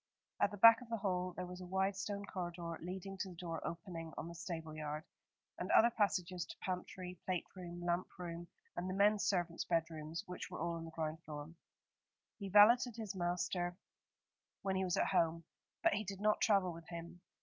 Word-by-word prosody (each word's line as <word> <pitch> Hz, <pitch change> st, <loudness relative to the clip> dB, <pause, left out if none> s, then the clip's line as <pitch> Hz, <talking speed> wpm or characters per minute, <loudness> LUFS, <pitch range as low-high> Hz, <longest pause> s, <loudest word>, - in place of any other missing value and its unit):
At -, -, +5 dB
the 205 Hz, -, -7 dB
back 230 Hz, +3 st, +9 dB
of 245 Hz, -, -11 dB
the 230 Hz, -, 0 dB
hall 185 Hz, -3 st, -1 dB
there 180 Hz, -, -3 dB
was 180 Hz, +1 st, -8 dB
a 180 Hz, -, -7 dB
wide 190 Hz, +2 st, +1 dB
stone 200 Hz, +1 st, -3 dB
corridor 175 Hz, -3 st, -4 dB
leading 190 Hz, +2 st, -5 dB
to 190 Hz, -, -2 dB
the 180 Hz, -, -10 dB
door 165 Hz, -1 st, -4 dB
opening 165 Hz, -1 st, -5 dB
on -, -, -4 dB
the 170 Hz, -, -7 dB
stable 165 Hz, -3 st, -5 dB
yard, 150 Hz, 0 st, -3 dB, 0.6 s
and -, -, -3 dB
other 235 Hz, +1 st, +7 dB
passages 185 Hz, -5 st, +1 dB
to -, -, -9 dB
pantry, 180 Hz, -1 st, -4 dB
plate 185 Hz, -2 st, -1 dB
room, 175 Hz, -1 st, -7 dB
lamp 175 Hz, +1 st, +1 dB
room, 175 Hz, -1 st, -5 dB, 0.3 s
and 180 Hz, +1 st, -2 dB
the 185 Hz, -, -2 dB
menservants' 195 Hz, -4 st, +3 dB
bedrooms, 165 Hz, 0 st, -1 dB
which 180 Hz, -2 st, -6 dB
were -, -, -6 dB
all 170 Hz, +1 st, 0 dB
on 165 Hz, 0 st, -4 dB
the -, -, -7 dB
ground 160 Hz, 0 st, -3 dB
floor. 150 Hz, 0 st, -6 dB, 0.9 s
He 200 Hz, -2 st, -4 dB
valeted 230 Hz, +4 st, +7 dB
his 215 Hz, -3 st, -4 dB
master 175 Hz, 0 st, -1 dB, 0.9 s
when 190 Hz, -1 st, +1 dB
he 190 Hz, -, +1 dB
was 180 Hz, -2 st, +1 dB
at -, -, +3 dB
home, 165 Hz, 0 st, +2 dB, 0.4 s
but -, -, +5 dB
he 210 Hz, +1 st, 0 dB
did 195 Hz, -1 st, -5 dB
not 210 Hz, +1 st, +3 dB
travel 195 Hz, -4 st, +4 dB
with 165 Hz, 0 st, -11 dB
him. 170 Hz, +1 st, -7 dB
180 Hz, 195 wpm, -37 LUFS, 170-195 Hz, 0.9 s, back